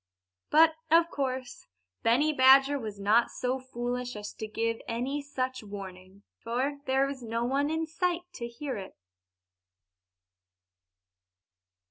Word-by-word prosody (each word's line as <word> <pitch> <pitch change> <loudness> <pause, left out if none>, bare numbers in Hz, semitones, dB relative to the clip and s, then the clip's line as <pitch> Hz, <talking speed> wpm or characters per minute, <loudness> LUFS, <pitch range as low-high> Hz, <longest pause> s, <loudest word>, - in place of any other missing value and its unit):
But, 320 +1 +6 0.2
of 335 +1 +5
course, 260 - -4 0.3
Benny 275 +7 +3
Badger 270 +1 +6
was 215 -4 -6
not 215 +4 +3
so 255 +1 -2
foolish 245 -1 -4
as 210 0 -6
to 220 - -6
give 225 +1 -2
any 255 +5 -2
such 260 -2 -3
warning, 195 -1 -10 0.2
for 260 +5 -1
there 265 +1 +2
was 275 -1 -5
no 230 0 -2
one 275 +3 +1
there 325 +3 0 0.2
to 235 -7 -5
hear 250 +1 -5
it. 190 -1 -8
255 Hz, 120 wpm, -29 LUFS, 230-280 Hz, 0.3 s, But